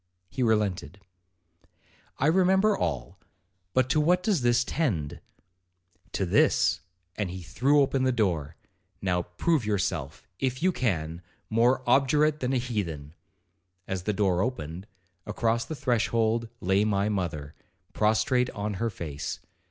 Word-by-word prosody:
he 130 - -4
relented.' 105 -4 0 1.2
'I 135 - 0
remember 190 +5 +4
all, - - -3 0.6
but 130 -1 +3
to 150 - +3
what 180 +4 +3
does 190 -7 +1
this 120 +1 +3
tend?' 105 - -2 0.9
'To 95 - -1
this,' 90 - +3 0.3
and 105 -4 -2
he 90 0 -7
threw 135 - +2
open 135 -1 +2
the 130 0 +3
door; 90 - -1 0.4
'now, 90 -2 0
prove 120 - 0
yourself, 95 -8 -2
if 130 +2 -2
you 185 - +4
can, 85 - -2 0.3
more 120 +3 +3
obdurate 150 +4 +3
than 125 0 -1
a - - +2
heathen.' 90 - -3 0.7
As 95 -1 -2
the 105 - -1
door 95 -3 +1
opened, 95 -6 -4 0.4
across 115 +2 0
the 160 - -5
threshold 115 -2 +1
lay 95 +3 +2
my 100 -1 +1
mother, 85 -8 -3 0.4
prostrate 110 +4 +2
on 105 0 -2
her 115 - +1
face. 75 -8 -5
110 Hz, 135 wpm, -27 LUFS, 90-130 Hz, 1.2 s, remember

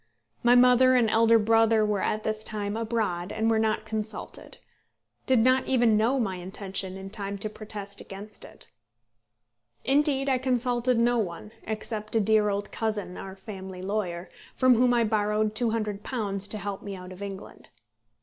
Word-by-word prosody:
My 240 +1 +5
mother 250 +1 +6
and 240 -3 +4
elder 230 +1 +5
brother 225 0 +3
were 210 -2 0
at 215 0 -1
this 215 0 -2
time 205 -1 -3
abroad, 215 -6 -2
and 220 +1 0
were 220 - +2
not 220 0 0
consulted; 220 0 -6 0.7
did 260 - +4
not 255 +3 +3
even 240 -4 +3
know 235 +6 +2
my 195 -6 -1
intention 190 +1 -5
in 195 0 -8
time 200 -1 -4
to 210 +2 -4
protest 205 -2 -6
against 205 +2 -10
it. - - -13 1.2
Indeed, 275 +1 +2
I 260 -2 +2
consulted 250 -1 +1
no 240 +1 +3
one, 200 +1 -4 0.2
except 215 0 -4
a - - +5
dear 215 0 +3
old 200 0 -3
cousin, 210 -5 -3
our 190 0 -8
family 190 -2 -8
lawyer, 185 -3 -3 0.2
from 255 -1 +5
whom 245 +1 +3
I 240 -1 +3
borrowed 210 0 0
£200 215 -2 -2
to 215 - -3
help 200 -1 -5
me 200 -1 -6
out 180 0 -10
of 185 +1 -11
England. 200 -1 -8
215 Hz, 165 wpm, -27 LUFS, 200-230 Hz, 1.2 s, mother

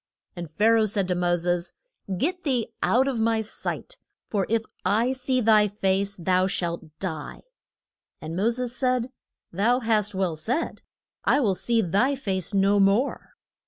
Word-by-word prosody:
And 175 -3 -6
Pha 185 +8 0
ra 225 -1 +4
oh - - +3
said 200 -2 -1
to - - +2
Mo 175 0 +1
ses, 175 0 -1 0.4
Get 360 - -1
thee 245 -6 -1
out 260 +3 +3
of 260 -4 -1
my 225 0 +2
sight. - - -6 0.3
For 200 -3 -1
if 225 0 +1 0.2
I 230 +5 +2
see 260 0 0
thy 215 -2 +5
face 200 0 -1
thou 185 +1 +2
shalt 170 -3 -2
die. 160 -6 -5 0.8
And 160 +1 -6
Mo 200 +6 +2
ses 245 +1 -2
said, 255 -1 0 0.4
Thou 230 +8 +2
hast 215 -3 0
well 185 -4 0
said: 240 - -2 0.4
I - - +3
will 215 -8 +2
see 230 +4 +1
thy 205 - +2
face 190 -8 -2
no 200 0 +3
more. 200 +8 +1
210 Hz, 165 wpm, -25 LUFS, 185-245 Hz, 0.8 s, thy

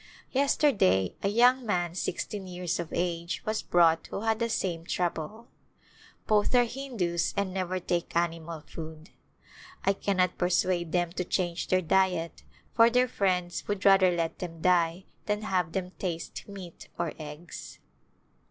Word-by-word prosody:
Yesterday 255 - +3
a - - +1
young 245 +5 +4
man 175 -6 0
six 180 - -2
teen 200 -3 -6
years 180 -1 -3
of 170 -2 -4
age 170 -1 -2
was 215 0 -1
brought 165 -2 +3
who - - -5
had 220 0 +1
the 235 0 0
same 175 -6 -1
trouble. 180 +6 -3 0.8
Both 210 +3 +2
are 245 - +7
Hindus 230 -9 -2
and 200 -2 0
never 185 -1 -1
take 175 -1 -2
animal 165 -1 -1
food. 160 +1 -9 0.7
I 195 - +4
cannot 185 -2 0
persuade 175 -1 +1
them 175 -1 +1
to 180 - -2
change 175 -1 -1
their 185 0 +2
diet 180 -1 +1 0.3
for 230 0 +6
their 250 +1 +3
friends 180 -5 -1
would 205 -2 -2
rather 195 -2 +7
let 170 -2 -1
them 165 -2 -6
die 175 0 +2 0.2
than 210 0 0
have 180 -6 0
them 185 -1 -2
taste 170 -3 -4
meat 190 -4 -10
or 170 -2 -2
eggs. 155 +3 -9
180 Hz, 150 wpm, -29 LUFS, 170-200 Hz, 0.8 s, are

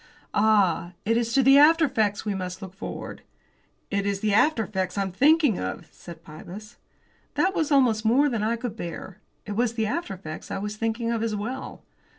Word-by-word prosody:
"Ah! 200 -5 +2
it 225 +2 +2
is 230 0 0
to 270 - +4
the 275 +2 +7
after 320 +2 +6
effects 215 -6 -1
we 210 - -1
must 185 -1 -5
look 190 -2 -9
forward." 195 - -7 0.7
"It 200 0 0
is 200 -1 -2
the 210 -2 +1
after 225 +2 +3
effects 190 -2 -3
I'm 195 -1 -1
thinking 285 - +3
of," 95 +1 -5
said 170 -1 -12
Pybus. 190 +8 -11 0.6
That 380 - +2
was 320 -4 -1
almost 245 -6 +3
more 250 +6 +4
than 235 -6 -1
I 220 +2 0
could 235 -2 -5
bear; 175 +3 -7 0.3
it 210 - -6
was 230 +2 0
the 220 -1 0
after 215 - -3
effects 155 -4 -9
I - - -3
was 210 +2 -4
thinking 225 +1 -2
of 230 -1 -1
as 225 -2 -1
well. 235 +6 -6
215 Hz, 195 wpm, -25 LUFS, 195-245 Hz, 0.7 s, the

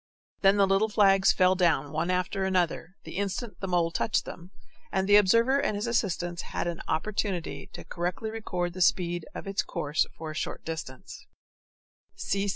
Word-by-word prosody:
Then 195 +1 +5
the 200 - +5
little 195 +3 +2
flags 195 -2 +5
fell 185 0 +4
down 170 -6 +1
one 160 +3 -1
after 185 +1 0
another, 180 -1 0
the - - -8
instant 200 +3 -3
the 195 - -4
mole 175 -2 +1
touched 210 - 0
them, 175 +1 -9 0.4
and 190 0 0
the 205 - +6
observer 230 +7 +5
and 215 - 0
his 205 - -2
assistants 180 -7 -1
had - - -4
an 170 -1 -3
opportunity 190 0 -2
to - - -8
correctly 180 +6 -3
record 180 -6 -3
the 185 - -6
speed 175 -2 +1
of - - -6
its 195 0 0
course 150 +1 -1
for 160 -1 -6
a - - -9
short - - -4
distance. 160 -5 -7
185 Hz, 170 wpm, -28 LUFS, 170-200 Hz, 0.4 s, the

